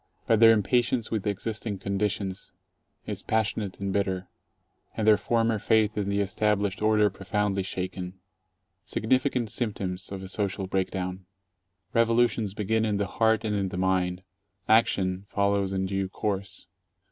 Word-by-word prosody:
But 115 -2 +3
their 115 0 +9
impatience 115 +2 +1
with 110 -3 -1
existing 105 +1 -2
conditions 100 0 -2 0.5
is - - -4
passionate 110 -2 -1
and 100 -1 -2
bitter, 95 -2 -1 0.7
and 110 - 0
their 110 - +8
former 115 0 +1
faith 110 0 +2
in 100 -1 -1
the 100 0 +1
established 100 0 0
order 105 -1 +4
profoundly 100 +1 -1
shaken. 95 0 -5 0.6
Significant 125 -1 0
symptoms 95 -6 -3
of 95 -1 -5
a - - -6
social 95 0 -2
breakdown! 95 -1 -3 0.7
Revolutions 115 -3 +2
begin 110 +1 0
in 105 -2 +1
the 100 - 0
heart 110 +3 +1
and 105 - 0
in 100 -2 0
the 90 - -5
mind. 90 0 0 0.4
Action 95 -4 +3
follows 100 -1 +1
in 95 0 -1
due 95 0 -2
course. 100 -3 -3
100 Hz, 140 wpm, -27 LUFS, 95-110 Hz, 0.7 s, their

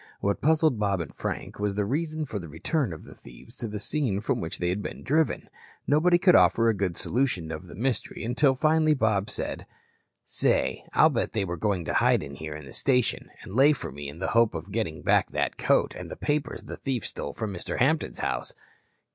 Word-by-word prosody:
What 100 0 -1
puzzled 155 -5 +3
Bob 100 -3 +1
and 80 -4 -5
Frank - - -5
was 105 -1 -1
the 105 0 0
reason 155 +5 -2
for 110 -6 -4
the 85 -4 -8
return 120 - -1
of 80 - -8
the - - -12
thieves - - -14
to 115 - -3
the 105 0 -5
scene 110 -1 -1
from 105 - -1
which 80 - -4
they 90 - -1
had 95 +3 -1
been - - -7
driven. 155 +3 +1 0.4
Nobody 175 +4 +4
could 180 0 +5
offer 115 0 +5
a 115 - +4
good 95 -5 -2
solution 115 -11 0
of 80 +3 -6
the - - -10
mystery 125 +4 -2
until 130 +4 +3
finally 155 +2 +3
Bob 110 -6 +1
said: - - -4 0.6
"Say, 65 - +1
I'll - - +6
bet - - -1
they 105 -3 0
were 85 -1 -3
going 90 0 -1
to - - -2
hide - - +3
here 75 +2 -7
in 75 -1 -9
the 65 - -11
station 125 -4 +1
and 95 - -9
lay 140 +6 +6
for 135 - -6
me 70 +1 -6
in 75 - -10
the 95 - -2
hope 115 -4 +3
of 85 +5 -6
getting 100 -8 -2
back - - +3
that - - -1
coat - - +2
and - - -7
the - - -6
papers 145 0 -2
the - - -7
thief 130 -5 -2
stole 70 - -5
from 110 -3 -3
Mr. 90 - -4
Hampton's 155 +5 +1
house." - - -2
110 Hz, 220 wpm, -27 LUFS, 90-140 Hz, 0.6 s, I'll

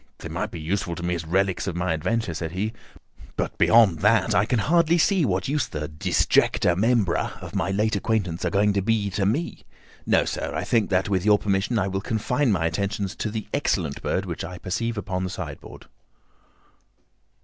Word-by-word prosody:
"They - - -8
might - - -3
be - - -7
useful 85 +2 -2
to 85 - -7
me 90 0 0
as 85 -1 -4
relics 95 +2 0
of 90 - -3
my 90 -1 0
adventure," 110 +4 -1
said 80 0 -5
he, 105 +4 -2 0.6
"but - - -2
beyond 110 -8 +5
that 105 +1 +3
I 90 +3 +3
can 125 +2 0
hardly 170 +7 +3
see 180 0 +3
what 95 -4 -1
use 145 0 0
the 75 0 -4
disjecta 80 +2 +2
membra 105 -2 +1
of - - -9
my 90 - -1
late 105 +3 +1
acquaintance 100 -5 -1
are 90 - +1
going 100 +3 +2
to 100 - +1
be 105 -1 0
to 95 0 0
me. 145 +12 -2 0.4
No, - - +3
sir, - - -3
I - - -1
think 115 -3 +1
that, 95 +1 +1
with 95 -3 0
your 105 0 +5
permission, 100 +3 0
I 100 -2 +1
will 95 0 -2
confine 125 +5 0
my 90 -5 +1
attentions 100 +3 -2
to 110 - -2
the 110 -1 -4
excellent 90 - -1
bird - - -1
which - - -5
I 90 +2 -7
perceive 115 +6 -3
upon 95 -2 -3
the 90 - -2
sideboard." 90 - -8
100 Hz, 200 wpm, -24 LUFS, 90-110 Hz, 0.6 s, beyond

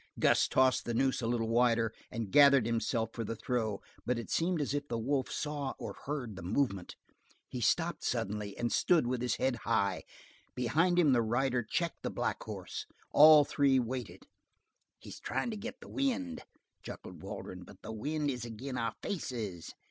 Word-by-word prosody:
Gus - - +4
tossed 130 0 +3
the 120 - -2
noose 130 +2 +1
a 115 - -1
little 115 -1 0
wider, 115 -1 +2 0.2
and 110 -3 -4
gathered 140 -2 +7
himself 115 0 0
for 115 - -3
the 115 +1 -4
throw, 110 -3 -2 0.2
but 125 0 0
it 115 - -6
seemed 170 0 +1
as 145 -2 -1
if 145 0 -2
the 115 - -2
wolf 130 +3 0
saw 145 -3 -3
or - - -6
heard 135 -7 -3
the 95 - -8
movement. 100 -1 -1 0.5
He - - -5
stopped - - +1
suddenly 105 0 -2
and 120 0 -1
stood 170 -7 +3
with 125 0 -1
his 125 -2 0
head 130 -2 0
high; 110 -4 0 0.5
behind 160 +9 +2
him 155 -6 +5
the 120 - +4
rider 120 +3 +1
checked 165 +9 -2
the - - -2
black - - -2
horse; - - -6 0.2
all 150 0 +9
three 140 -2 +3
waited. 125 -2 -3 0.7
"He's - - -10
tryin' 240 - -2
to - - -4
get 245 +5 -7
the - - -11
wind," 265 -2 -2 0.4
chuckled - - -9
Waldron, 90 0 -7
"but 95 +1 -15
the 110 - -6
wind 145 +6 -1
is 125 -3 -5
ag'in' 120 +3 -5
our 115 -1 -2
faces!" 115 - -4
125 Hz, 180 wpm, -32 LUFS, 115-145 Hz, 0.7 s, all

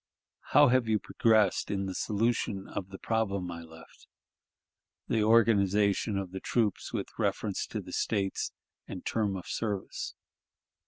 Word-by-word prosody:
"... - - -63
How 145 0 +8
have 125 -2 +3
you 110 -1 +3
progressed 110 -2 +2
in 100 -1 -1
the 95 - -3
solution 105 -1 -1
of 95 - -5
the 95 - -8
problem 100 -6 -1
I 85 0 -6
left 80 0 -15 1.0
the 110 - +1
organization 105 -2 +3
of 95 -2 -4
the 95 - -5
troops 105 -1 0
with - - -3
reference - - -1
to - - -4
the - - -10
States, 100 -3 -1 0.4
and 90 - -7
term 105 -3 0
of 90 - -6
service? 105 -4 -3
100 Hz, 150 wpm, -30 LUFS, 95-110 Hz, 1.0 s, How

